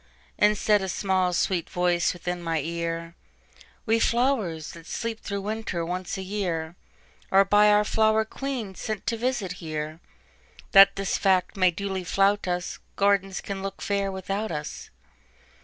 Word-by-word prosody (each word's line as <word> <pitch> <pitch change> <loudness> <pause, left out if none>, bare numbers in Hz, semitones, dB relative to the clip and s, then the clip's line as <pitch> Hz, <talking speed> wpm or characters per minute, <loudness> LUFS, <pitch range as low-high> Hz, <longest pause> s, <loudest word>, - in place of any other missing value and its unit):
And 210 0 +4
said 210 0 +3
a 190 - -3
small, 185 -1 +1
sweet 175 -1 0
voice 175 -1 +1
within 180 0 -4
my 165 -1 -1
ear:"We 170 +6 -5
flowers, 225 - +1
that 165 -1 -13
sleep 230 -1 -4
through 200 -1 -4
winter, 210 -5 -3
once 180 +2 -4
a 190 - -4
yearAre 185 0 -2
by 210 +1 +6
our 210 0 +5
flower 220 +1 +2
queen 245 -4 -4
sent 215 +1 -5
to 230 - 0
visit 235 -5 -1
here, 155 -1 -4 0.7
That 195 0 +8
this 195 -1 -1
fact 185 -2 +2
may 185 -2 +4
duly 190 +1 -3
flout 195 +3 +2
us,—Gardens 195 +2 -1
can 195 -1 -5
look 195 0 -5
fair 200 -1 -1
without 195 +2 -3
us. 150 -1 -6
195 Hz, 140 wpm, -26 LUFS, 175-210 Hz, 0.7 s, That